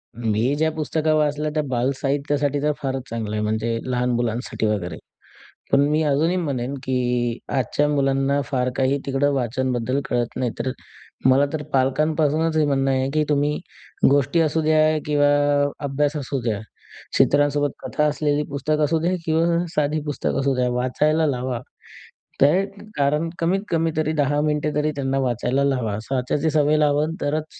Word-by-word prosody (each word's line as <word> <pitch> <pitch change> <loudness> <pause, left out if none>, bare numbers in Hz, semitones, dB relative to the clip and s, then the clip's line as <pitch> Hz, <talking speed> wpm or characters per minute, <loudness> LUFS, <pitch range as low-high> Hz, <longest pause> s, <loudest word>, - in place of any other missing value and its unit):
मी 110 -2 0
जे 160 +2 +1
पुस्तकं 155 0 0
वाचलं 150 0 0
ते 155 - +2
बालसाहित्यासाठी 140 +3 0
तर 150 0 +2
फारच 135 -1 -2
चांगलं 110 -2 -3
आहे, 105 - -1
म्हणजे 110 +2 -1
लहान 125 -1 0
मुलांसाठी 120 -1 -2
वगैरे. 95 -6 -2 0.7
पण 140 - +5
मी 155 +1 +2
अजूनही 160 +6 +2
म्हणेन 135 -5 -2
की 125 -2 0
आजच्या 140 +3 0
मुलांना 135 -1 +1
फार 125 -2 0
काही 135 +1 +1
तिकडे 135 +1 +1
वाचनाबद्दल 125 +1 -1
कळत 120 -1 -1
नाही. 125 -2 -1
तर 130 +2 -1 0.6
मला 135 +2 +5
तर 155 -1 -3
पालकांपासूनच 155 +4 +1
हे 155 - +3
म्हणणं 135 -1 +1
आहे 130 0 0
की 155 0 +2
तुम्ही 145 0 +1 0.5
गोष्टी 140 +3 +2
असू 160 0 +1
द्या 155 0 +3 0.3
किंवा 145 -1 +3 0.6
अभ्यास 145 +2 0
असू 140 -1 -3
द्या, 110 -4 -1 0.6
चित्रांसोबत 145 0 +3
कथा 150 - 0
असलेली 150 0 +1
पुस्तकं 150 +2 0
असू 160 +2 +1
द्या 175 +3 0
किंवा 170 +2 +2
साधी 150 +1 +1
पुस्तकं 145 -2 -2
असू 135 0 +1
द्या, 125 -1 +1
वाचायला 150 +6 +1
लावा. 125 -3 -2 0.8
त्याही 165 +8 +4 0.3
कारण 150 +4 +1
कमीत 180 +4 +1
कमी 165 -1 +1
तरी 155 0 +1
10 145 -1 +1
मिनिटे 150 0 0
तरी 150 +1 +1
त्यांना 135 -1 -1
वाचायला 130 +1 0
लावा. 125 -6 0
असं 115 +6 -4
वाचायची 140 +5 0
सवय 150 0 +3
लावाल 150 +1 +2
तरच, 150 +2 -1
140 Hz, 155 wpm, -22 LUFS, 130-150 Hz, 0.8 s, पण